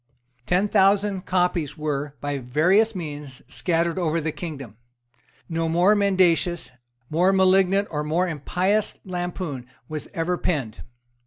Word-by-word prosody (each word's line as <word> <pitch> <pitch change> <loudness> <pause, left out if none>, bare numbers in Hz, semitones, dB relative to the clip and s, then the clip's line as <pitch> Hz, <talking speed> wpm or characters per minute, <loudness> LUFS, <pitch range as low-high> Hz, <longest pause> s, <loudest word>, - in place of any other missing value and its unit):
Ten 185 +3 +2
thousand 195 -1 +2
copies 180 -5 0
were, 145 -1 -3
by 145 -1 -2
various 180 - +2
means, 145 -6 -7
scattered 170 0 0
over 165 -2 0
the 160 0 -2
kingdom. 140 - -8 0.7
No 165 0 -1
more 175 +5 +4
mendacious, 185 -5 +2 0.4
more 175 +5 +3
malignant 190 +1 +3
or 150 -1 -2
more 165 +5 0
impious 180 +6 -1
lampoon 175 -7 -4 0.2
was 155 -2 -6
ever 175 +2 -1
penned. 135 -10 -2
170 Hz, 125 wpm, -24 LUFS, 150-185 Hz, 0.7 s, more